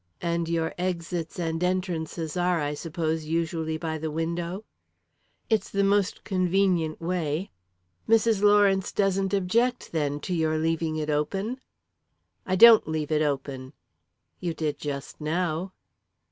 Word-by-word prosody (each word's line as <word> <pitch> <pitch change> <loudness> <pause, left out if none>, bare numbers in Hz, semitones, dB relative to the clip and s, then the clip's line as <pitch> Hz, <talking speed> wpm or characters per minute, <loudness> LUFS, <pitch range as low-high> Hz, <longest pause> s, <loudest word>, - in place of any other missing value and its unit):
"And 170 -1 -1
your 165 -1 0
exits 170 -2 -3
and 165 -1 -2
entrances 175 -3 -2
are, 180 -1 +1
I 145 -1 -1
suppose, 160 0 -3
usually 160 0 -1
by 160 -1 -3
the 160 +1 -3
window?" 170 +5 -3 0.8
"It's 220 -2 +1
the 200 0 +1
most 200 0 +1
convenient 185 -4 +1
way." 170 0 -2 0.6
"Mrs. 225 -2 +4
Lawrence 205 -2 +4
doesn't 195 -1 +1
object, 225 +6 +1
then, 145 -3 -1
to 180 - -3
your 160 -2 +1
leaving 160 0 0
it 155 -1 -2
open?" 195 - -2 0.9
"I 185 - +1
don't 230 +3 +8
leave 155 -1 -2
it 155 0 +2
open." 135 -2 -2 0.7
"You 170 -2 -3
did 155 -3 -2
just 140 0 -6
now." 170 +3 -1
170 Hz, 130 wpm, -26 LUFS, 155-190 Hz, 0.9 s, don't